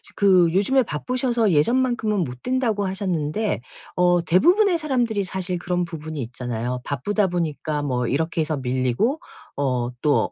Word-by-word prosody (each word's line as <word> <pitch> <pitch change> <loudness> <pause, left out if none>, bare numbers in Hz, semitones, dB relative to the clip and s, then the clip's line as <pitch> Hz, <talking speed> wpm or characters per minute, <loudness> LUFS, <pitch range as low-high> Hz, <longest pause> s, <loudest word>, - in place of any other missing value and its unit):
그 185 -4 +4
요즘에 255 +8 +3
바쁘셔서 235 - 0
"예전만큼은 225 - +2
못 125 -3 -7
뛴다."고 235 -6 0
하셨는데 185 +1 -1 0.4
어 175 -1 +3
대부분의 350 - +4
사람들이 245 -9 0
사실 185 -1 -3
그런 180 0 -1
부분이 155 -2 -6
있잖아요. 125 0 -4
바쁘다 200 - 0
보니까 155 -4 -2
뭐 125 -4 -1
이렇게 160 +5 0
해서 155 -1 -1
밀리고 130 - 0 0.4
어 125 -4 0
또 150 -1 +3
175 Hz, 335 characters per minute, -23 LUFS, 145-220 Hz, 0.4 s, 그